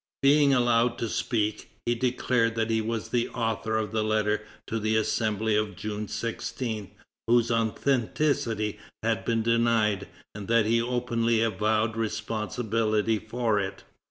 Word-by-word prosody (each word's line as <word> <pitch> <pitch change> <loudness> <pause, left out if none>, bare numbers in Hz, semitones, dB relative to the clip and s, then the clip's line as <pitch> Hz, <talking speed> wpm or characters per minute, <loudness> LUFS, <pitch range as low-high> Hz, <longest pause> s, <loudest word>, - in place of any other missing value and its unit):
Being 140 0 +5
allowed 120 -2 +3
to 115 - -2
speak, 110 -1 -1 0.2
he 120 - +2
declared 120 -1 +1
that 115 0 0
he 110 0 +2
was 115 0 -3
the 120 -1 0
author 115 -1 -1
of 110 -3 -2
the 110 -1 0
letter 105 0 +1 0.2
to 115 - -2
the 110 +1 0
Assembly 110 0 +1
of 105 -2 0
June 105 +2 -4
16, 115 -1 -4 0.4
whose 120 0 +3
authenticity 115 -1 0 0.2
had - - 0
been 115 -1 +1
denied, 115 -4 +2 0.3
and 100 -2 -7
that 115 -1 +3
he 115 +1 +3
openly 115 -2 0
avowed 110 +1 +1
responsibility 110 0 -1
for 110 -1 0
it. 95 -1 -4
115 Hz, 140 wpm, -27 LUFS, 110-115 Hz, 0.4 s, Being